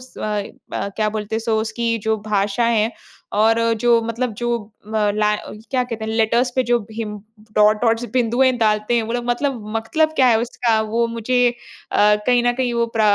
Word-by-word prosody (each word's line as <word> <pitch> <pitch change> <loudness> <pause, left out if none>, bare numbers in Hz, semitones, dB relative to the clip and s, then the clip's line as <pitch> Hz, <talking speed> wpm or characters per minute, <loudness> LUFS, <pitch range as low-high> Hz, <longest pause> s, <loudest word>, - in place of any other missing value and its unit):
स 255 0 -15
अ - - -6 0.5
अ, - - -2
क्या 215 -1 +1
बोलते 210 0 -4
हैं - - -2
सो 220 -1 0
उसकी 230 +1 -1
जो 220 - +3
भाषाएँ 215 +3 +1
हैं 225 +2 0 0.5
और 225 +1 +4 0.2
जो 240 -1 +4
मतलब 230 +1 -2
जो 240 - -2 0.5
म - - -1 0.2
लैं 210 0 +2 0.3
क्या 255 -2 +1
कहते 230 -3 -5
हैं 220 - -3
लेटर्स 230 +3 +2
पे 260 - +2
जो 240 - +4
हिम 215 -2 -5 0.4
डॉट 210 0 +5
डॉट्स 230 0 +2
बिंदुएँ 250 +1 +3
डालते 215 +1 +1
हैं 230 - +2
वो 225 +2 -4
लोग 240 0 -2
मतलब 245 0 -1 0.2
मतलब 310 +8 +1
क्या 260 - +5
है 225 - +4
उसका 235 -2 0
वो 235 +1 +1
मुझे 230 +2 -2 0.6
अ, 210 0 +5
कहीं 245 -1 +4
न 245 - +4
कहीं 250 -1 -1
वो 235 0 +1
प्र - - +2
230 Hz, 200 wpm, -20 LUFS, 220-245 Hz, 0.6 s, डॉट